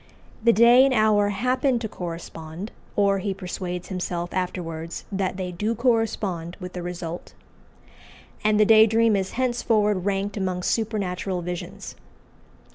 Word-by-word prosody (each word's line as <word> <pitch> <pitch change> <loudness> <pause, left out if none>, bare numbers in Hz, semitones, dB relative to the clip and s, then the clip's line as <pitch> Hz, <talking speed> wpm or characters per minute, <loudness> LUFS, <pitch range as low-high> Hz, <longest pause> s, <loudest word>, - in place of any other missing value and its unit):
The 235 - +6
day 235 +4 +7
and 270 -1 +3
hour 210 -2 +4
happen 250 +5 +1
to 230 -1 -3
correspond, 170 +1 -7 0.2
or 200 -1 +3
he 195 0 -2
persuades 180 -1 -5
himself 175 -2 -3
afterwards 170 -3 -4
that 190 -1 -1
they 185 -1 -3
do 210 +6 -1
correspond 215 -8 0
with 180 -1 -7
the 180 - -5
result, 175 -1 -6 1.1
and 215 0 +3
the 215 - +6
day 220 +1 +7
dream 225 0 +3
is 190 -1 -2
henceforward 220 -6 +1
ranked 200 +1 -1
among 185 -2 -2
supernatural 195 -5 -1
visions. 175 0 -6
195 Hz, 135 wpm, -24 LUFS, 180-220 Hz, 1.1 s, day